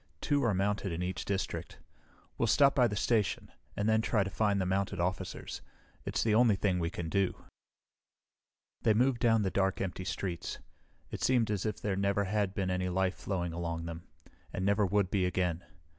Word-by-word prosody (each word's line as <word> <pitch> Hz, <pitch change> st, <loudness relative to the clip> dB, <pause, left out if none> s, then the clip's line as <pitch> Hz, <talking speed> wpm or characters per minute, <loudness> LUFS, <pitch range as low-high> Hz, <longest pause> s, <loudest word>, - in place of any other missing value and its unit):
Two 145 Hz, -, +1 dB
are 115 Hz, -4 st, +2 dB
mounted 100 Hz, 0 st, 0 dB
in 85 Hz, +2 st, -2 dB
each 90 Hz, 0 st, -3 dB
district. 100 Hz, -1 st, -3 dB, 0.6 s
We'll 115 Hz, -, 0 dB
stop 140 Hz, +4 st, +5 dB
by 125 Hz, -3 st, +4 dB
the 105 Hz, -, -3 dB
station, 105 Hz, -4 st, 0 dB, 0.3 s
and 100 Hz, -, 0 dB
then 110 Hz, 0 st, +4 dB
try 110 Hz, -2 st, +2 dB
to 95 Hz, -, -5 dB
find 100 Hz, +1 st, +1 dB
the 95 Hz, -, 0 dB
mounted 95 Hz, +1 st, -1 dB
officers. 90 Hz, +2 st, -3 dB, 0.4 s
It's -, -, 0 dB
the 110 Hz, -, +2 dB
only 115 Hz, -1 st, +5 dB
thing 95 Hz, -2 st, +1 dB
we 85 Hz, -1 st, 0 dB
can 85 Hz, -1 st, -5 dB
do." 95 Hz, +2 st, +1 dB, 1.5 s
They 110 Hz, -, +3 dB
moved 125 Hz, +1 st, +3 dB
down 115 Hz, -2 st, +4 dB
the 95 Hz, -, 0 dB
dark, 95 Hz, -1 st, +1 dB
empty 95 Hz, -1 st, -3 dB
streets. 90 Hz, -2 st, -3 dB, 0.5 s
It -, -, -5 dB
seemed 120 Hz, -4 st, +2 dB
as 105 Hz, 0 st, -1 dB
if 105 Hz, -, -3 dB
there 100 Hz, -2 st, -1 dB
never 100 Hz, +1 st, +1 dB
had 100 Hz, -1 st, -1 dB
been 95 Hz, -2 st, -1 dB
any 90 Hz, 0 st, -1 dB
life 95 Hz, +1 st, +1 dB
flowing 90 Hz, -4 st, -3 dB
along 85 Hz, -1 st, -3 dB
them, 85 Hz, 0 st, -7 dB, 0.4 s
and 95 Hz, -, -2 dB
never 100 Hz, 0 st, +3 dB
would 100 Hz, -1 st, +1 dB
be 95 Hz, -3 st, +2 dB
again. 90 Hz, -2 st, -1 dB
100 Hz, 190 wpm, -31 LUFS, 90-105 Hz, 1.5 s, stop